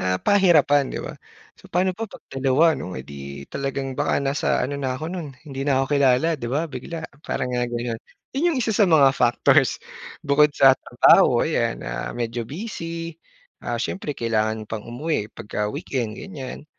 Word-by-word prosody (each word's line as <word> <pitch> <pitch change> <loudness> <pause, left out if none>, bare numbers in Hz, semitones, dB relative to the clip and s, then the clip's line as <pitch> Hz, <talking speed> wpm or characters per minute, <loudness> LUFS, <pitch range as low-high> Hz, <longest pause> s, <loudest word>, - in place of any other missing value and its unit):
ah, 95 0 +1
pahirapan 160 -8 +4
di - - -4
ba. - - -6 0.4
So - - -18
pa'no 185 +2 +1
pa 225 +4 -5
pag - - -14
dalawa 135 +5 +3
'no, 95 - -6
eh, 65 - -8
di 70 0 -9
talagang 135 -1 -3
baka - - +1
nasa 140 +1 -1 0.2
ano 140 +2 -3
na 130 -1 -2
ako 155 - -6
no'n 170 -5 -5 0.2
hindi 135 -2 -5
na 140 -2 +2
ako - - -7
kilala 140 +2 +4
di 120 - -3
ba, 145 +6 0
bigla 160 +2 -7 0.2
parang 125 -4 -3
nga 120 0 0
gano'n. 120 -1 -3 0.3
Yun 305 +6 +1
yung 300 - -1
isa 230 -3 0
sa 205 -4 +4
mga 140 -5 +6
factors 120 -2 +3 0.5
bukod 150 +2 +4
sa 135 -1 +7
trabaho - - +4
ayan, - - -1
ah, - - -4
medyo 120 0 -2
busy, 165 -2 -5 0.5
ah, - - -2
siyempre 150 -6 -4
kailangan 110 -1 -1
pang 110 -1 -5
umuwi 125 -3 -2
pagka 105 -2 -4
weekend 115 -4 -3
ganyan. 145 -8 -8
135 Hz, 180 wpm, -23 LUFS, 120-160 Hz, 0.5 s, sa